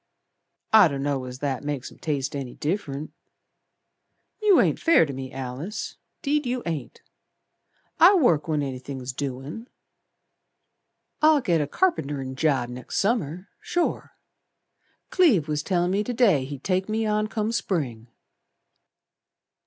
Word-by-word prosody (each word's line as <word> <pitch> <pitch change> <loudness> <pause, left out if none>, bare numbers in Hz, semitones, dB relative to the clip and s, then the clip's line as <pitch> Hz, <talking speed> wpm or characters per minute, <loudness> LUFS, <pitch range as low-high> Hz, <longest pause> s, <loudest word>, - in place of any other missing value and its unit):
"I 215 -4 +9
dunno 140 -2 -2
as 125 0 -7
that 135 -1 -2
makes 145 -3 -4
'em - - -17
taste 145 -2 -2
any 135 -3 -5
diff'rent. 155 -3 -3 1.3
You 415 -3 +5
ain't - - +2
fair 330 - +5
to 140 - -6
me, 130 0 -6
Alice, 135 - -5 0.3
'deed 290 -1 +1
you 245 0 -2
ain't. 155 -8 -5 1.0
I 365 +5 +8
work 170 - +3
when 150 -2 0
anythin's 130 -1 -5
doin'. 140 - -5 1.5
I'll 310 -1 +6
get 175 - +1
a 145 - -1
carpenterin' 145 - -1
job 135 -4 +1
next 125 +1 -6
Summer 185 - -1
sure. 350 -1 -2 1.0
Cleve 255 - +4
was 150 -1 -1
tellin' 175 0 0
me 200 +2 +1
to 245 - -3
day 195 - +4
he'd 140 -1 -8
take 190 +1 0
me 220 +1 0
on 215 0 +1
come 215 0 -2
Spring." 135 - -2
155 Hz, 130 wpm, -25 LUFS, 135-215 Hz, 1.5 s, I